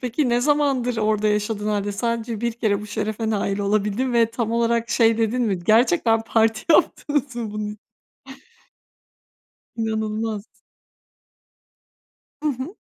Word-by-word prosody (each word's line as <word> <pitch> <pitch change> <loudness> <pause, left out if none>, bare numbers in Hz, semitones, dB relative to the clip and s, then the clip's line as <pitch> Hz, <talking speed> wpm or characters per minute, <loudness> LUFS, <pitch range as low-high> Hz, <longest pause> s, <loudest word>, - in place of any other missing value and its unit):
Peki 250 +3 -1
ne 240 0 +2
zamandır 275 -3 +1
orada 215 -1 +1
yaşadığın 210 0 -1
hâlde 205 -1 -1
sadece 230 +1 -2
1 235 0 -1
kere 215 -3 0
bu 210 - -8
şerefe 215 +1 -3
nail 200 -2 -1
olabildin 210 +5 0
ve 230 -1 +3
tam 230 -1 -2
olarak 235 0 +1
şey 225 -1 +3
dedin 230 +2 +1
mi? 205 -6 0
"Gerçekten 225 - +3
parti 225 0 +1
yaptınız 290 -5 +1
mı 230 -3 -4
bunun 210 0 -4
i" - - -12 2.0
İnanılmaz. 220 -1 -2 2.0
Hı 305 - +1
hı. 275 +6 -4
225 Hz, 130 wpm, -22 LUFS, 210-240 Hz, 2.0 s, ve